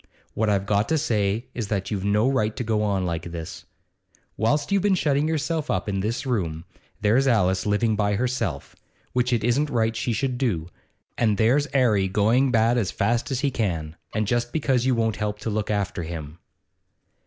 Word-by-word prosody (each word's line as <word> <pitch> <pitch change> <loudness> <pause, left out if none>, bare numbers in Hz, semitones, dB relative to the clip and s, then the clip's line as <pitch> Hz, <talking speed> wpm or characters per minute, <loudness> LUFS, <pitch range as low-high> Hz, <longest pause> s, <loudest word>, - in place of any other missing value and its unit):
What 110 0 0
I've 100 -1 +1
got 105 +1 +1
to 160 - +2
say 105 -4 0
is 115 -4 -3
that 100 -1 -2
you've 100 -3 -2
no 105 +4 +2
right 110 -5 +1
to - - -3
go 110 -2 0
on 100 -3 0
like 85 -1 -3
this. 85 -2 -7 0.7
Whilst 145 - 0
you've 200 -1 +3
been 200 -1 +3
shutting 150 -3 +1
yourself 160 0 -1
up 95 +2 -1
in 100 -1 -1
this 115 +8 -2
room, 85 -10 -2 0.4
there's 120 +6 +3
Alice 95 -5 +2
living 105 +2 +2
by 105 -1 +1
herself, 125 +4 -2 0.4
which 125 0 +1
it 120 -3 +1
isn't 135 +6 +1
right 115 -2 0
she 115 +2 -1
should 125 +1 -1
do; 90 -11 -1 0.5
and 110 -4 +2
there's 130 +6 +3
'Arry 110 -8 +3
going 110 +7 +3
to - - +2
the - - -1
bad 115 +1 +3
as 100 -5 -1
fast 120 +6 0
as 135 -2 -1
he 140 -2 +1
can, 85 -10 -2 0.2
and 110 0 -1
just 120 +2 0
because 135 -5 +1
you 130 - +3
won't 110 -2 0
help 105 -1 -2
to 110 - -2
look 105 0 -2
after 100 -4 -1
him. 80 -1 -7
110 Hz, 200 wpm, -24 LUFS, 100-125 Hz, 0.7 s, you've